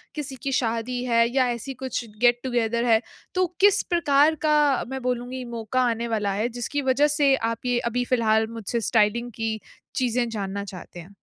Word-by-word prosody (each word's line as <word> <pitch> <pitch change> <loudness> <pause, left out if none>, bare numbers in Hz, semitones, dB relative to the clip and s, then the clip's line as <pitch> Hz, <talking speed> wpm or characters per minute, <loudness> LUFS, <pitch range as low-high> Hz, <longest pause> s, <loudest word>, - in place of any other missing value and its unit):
किसी 280 -3 -5
की 275 - -1
शादी 245 0 -1
है 230 -1 +3
या 255 -2 +4
ऐसी 240 +3 -5
कुछ 260 -1 -4 0.2
गेट-टुगेदर 240 -1 +2
है, 225 -1 +4 0.3
तो 370 0 +3 0.2
किस 405 0 +5
प्रकार 310 -2 +3
का 295 -3 +3
मैं 265 -1 -4
बोलूँगी 250 +1 -3
मौक़ा 230 +2 -1
आने 230 +1 -2
वाला 210 -3 -1
है 215 +4 0
जिसकी 245 +4 -3
वजह 290 +3 +4
से 275 -2 +5 0.2
आप 230 +2 -7
ये 245 -1 +1
अभी 245 +1 -1
फ़िलहाल 220 -3 +2
मुझसे 230 +1 -3
स्टाइलिंग 230 +2 +1
की 225 -1 -2 0.4
चीज़ें 245 -1 +1
जानना 200 -2 -4
चाहते 180 -2 -10
हैं? 185 +4 -12
240 Hz, 175 wpm, -24 LUFS, 225-260 Hz, 0.4 s, किस